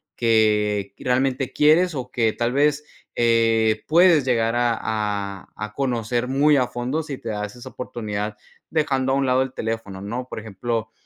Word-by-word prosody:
que 105 -3 +2
realmente 130 +1 0
quieres 160 +3 +4
o 130 - -5
que 115 -2 +1
tal 120 0 -1
vez, 150 +1 +2 0.3
eh, 115 -2 +2
puedes 165 -2 +5
llegar 115 -3 +1
a 120 -1 +1
a 100 -3 -3
a 105 0 -6
conocer 120 -2 -1
muy 145 +3 +3
a 130 -3 +2
fondo 125 +7 -2
si 145 -4 -6
te 115 - -7
das 105 +1 -4
esa 120 - -10
oportunidad 105 -4 -5 0.3
dejando 135 -4 +1
a - - +2
un 140 0 +1
lado 130 0 +3
el 130 -1 -3
teléfono, 110 -5 -4
¿no? 120 +5 -5
Por - - -5
ejemplo, 110 +2 -4
120 Hz, 170 wpm, -23 LUFS, 110-135 Hz, 0.3 s, puedes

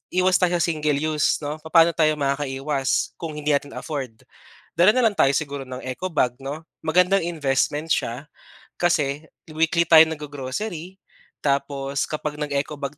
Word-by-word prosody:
iwas 185 0 +4
tayo 180 -1 +2
sa 170 - +1
single 155 -3 0
use 155 -1 0
'no 150 +2 -4
papaano 165 +2 +4
tayo 155 -2 +2
makakaiwas 140 -1 -1
kung 160 -3 -5
hindi 150 0 -1
natin 145 0 -1
afford, 135 -7 -5 0.6
dala 195 +7 +6
na 255 - +3
lang 215 -3 +2
tayo 135 - +4
siguro 140 -3 -3
ng 130 0 -7
ecobag 130 -1 -1
'no, 145 +4 -6 0.2
magandang 180 +3 +3
investment 150 0 -1
siya 130 +6 -2 0.5
kasi 150 -4 +1 0.3
weekly 165 +1 +2
tayo 160 -1 +9
naggo-grocery 155 +6 -6 0.4
tapos 140 -1 -1
kapag 150 -1 -3
nag-ecobag 145 -1 -3
150 Hz, 145 wpm, -23 LUFS, 140-165 Hz, 0.6 s, tayo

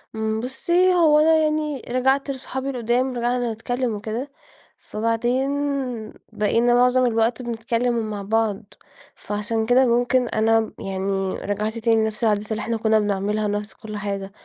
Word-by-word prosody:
امم 220 0 -1
بُصّي، 345 +9 +1
هو 315 -4 +5
أنا 320 +1 +5
يعني 305 -3 0
رجعت 265 +3 +1
لصحابي 265 0 -5
القدّام 250 0 0
رجعنا 240 -1 0
نتكلّم 245 +1 -2
وكده، 225 +7 -5 0.5
فبعدين 230 +4 -1 0.8
بقينا 230 +3 +2
معظم 250 +1 +4
الوقت 230 +1 +1
بنتكلم 235 0 -1
ومع 215 -3 -3
بعض. 220 0 0 0.5
فعشان 210 +2 -2
كده 250 +3 +4
ممكن 245 +1 +2
أنا 225 +1 +2
م 220 - -4
يعني 195 0 -2
رجعت 210 +2 -3
تاني 225 -1 +2
لنفس 220 +1 -3
العادات 215 -1 +1
اللي 220 0 -1
إحنا 230 0 -2
كنّا 220 0 +3
بنعملها 210 +1 -1
نفس 205 +1 -3
كل 215 -1 -8
حاجة، 200 -1 -4
230 Hz, 145 wpm, -22 LUFS, 215-250 Hz, 0.8 s, هو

